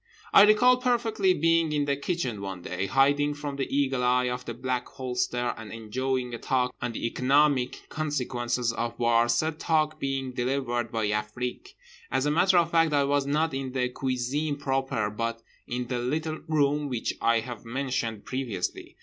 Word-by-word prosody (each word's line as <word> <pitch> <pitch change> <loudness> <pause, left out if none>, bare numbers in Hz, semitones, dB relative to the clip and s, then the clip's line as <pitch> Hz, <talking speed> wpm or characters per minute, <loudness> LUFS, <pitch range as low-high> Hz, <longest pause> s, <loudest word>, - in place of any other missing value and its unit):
I - - +9
recall 245 +4 +5
perfectly 235 -6 +1
being 165 0 +2
in 145 -1 +1
the 140 -1 +1
kitchen 140 - -2
one 95 -3 -6
day, 90 +2 -3
hiding 145 +6 +3
from 145 -1 -5
the 135 - -2
eagle 135 -2 +1
eye 125 0 +3
of 125 0 -5
the 120 - -5
Black 125 0 -2
Holster 125 -1 -2
and 110 -2 -9
enjoying 125 +3 -2
a 115 - -4
talk 125 -1 0
on 120 -1 -2
the - - -4
economic 130 +1 +2
consequences 125 -5 -1
of 115 +1 -3
war, 120 0 +3
said 155 +6 0
talk 155 -1 +1
being 135 -2 -2
delivered 120 -2 -1
by 110 -1 -1
Afrique. 120 - -4 0.3
As 135 - 0
a 150 - +2
matter 180 +4 +4
of 170 -1 +3
fact, 165 -2 +3
I 145 -1 +4
was 140 0 +1
not 155 +2 +1
in 135 -1 -4
the 125 -1 0
cuisine 130 +4 -1
proper 135 -6 -1
but 115 +1 -3 0.2
in 125 0 -3
the 120 0 -2
little 155 +6 -2
room 145 -1 +1
which 120 -3 -2
I 115 -1 +3
have 120 -2 -8
mentioned 120 -3 -3
previously. 120 -9 -4
130 Hz, 175 wpm, -27 LUFS, 120-145 Hz, 0.3 s, I